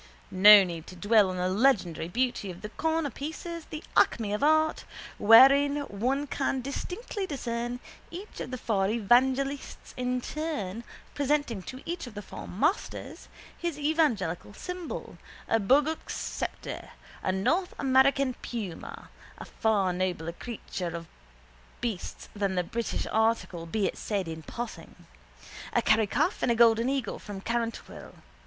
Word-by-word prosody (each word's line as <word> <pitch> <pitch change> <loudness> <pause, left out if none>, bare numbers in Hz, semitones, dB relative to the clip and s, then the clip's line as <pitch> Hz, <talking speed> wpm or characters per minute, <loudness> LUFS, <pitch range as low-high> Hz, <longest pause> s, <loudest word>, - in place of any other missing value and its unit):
No 205 +2 +9
need 170 -3 -6
to 185 - -10
dwell 205 +1 +4
on 185 - -4
the 180 0 0
legendary 190 -6 +2
beauty 240 0 -1
of 180 +1 -9
the 210 - -5
cornerpieces, 320 +3 -3
the 310 +1 -6
acme 210 -3 +3
of 210 - -2
art, 315 +1 +3 0.4
wherein 275 +6 +7
one 265 +4 -1
can 265 -1 -1
distinctly 365 - -4
discern 240 -4 -3 0.3
each 370 +5 -9
of - - -5
the 255 - -4
four 200 -5 0
evangelists 260 +6 +1
in 250 0 -1
turn 240 - -4 0.3
presenting 285 -7 0
to 255 +8 -9
each 335 -5 -4
of 230 - -11
the 205 - -6
four - - -9
masters 300 - -2 0.3
his 340 -4 -3
evangelical 240 - 0
symbol, 360 - -6 0.3
a 225 - +2
bogoak 285 +9 +2
sceptre, - - -5 0.3
a - - 0
North 335 - 0
American 265 0 +3
puma 205 -9 -6 0.3
(a - - -8
far 205 -5 +1
nobler 180 -2 -2
king 230 +6 -7 0.4
of 170 0 -6 0.7
beasts 225 -7 -4
than 200 -2 -1
the 180 - +1
British 230 +6 -3
article, 220 -6 0
be 205 +4 0
it - - -2
said 200 -4 -2
in 160 0 -6
passing), 220 -3 -8 0.7
a - - +3
Kerry 220 -1 +4
calf 350 - 0
and - - +2
a - - +2
golden 230 +1 +5
eagle 265 -6 -2
from 205 -2 -7
Carrantuohill. 230 +2 -4
235 Hz, 145 wpm, -28 LUFS, 200-280 Hz, 0.7 s, No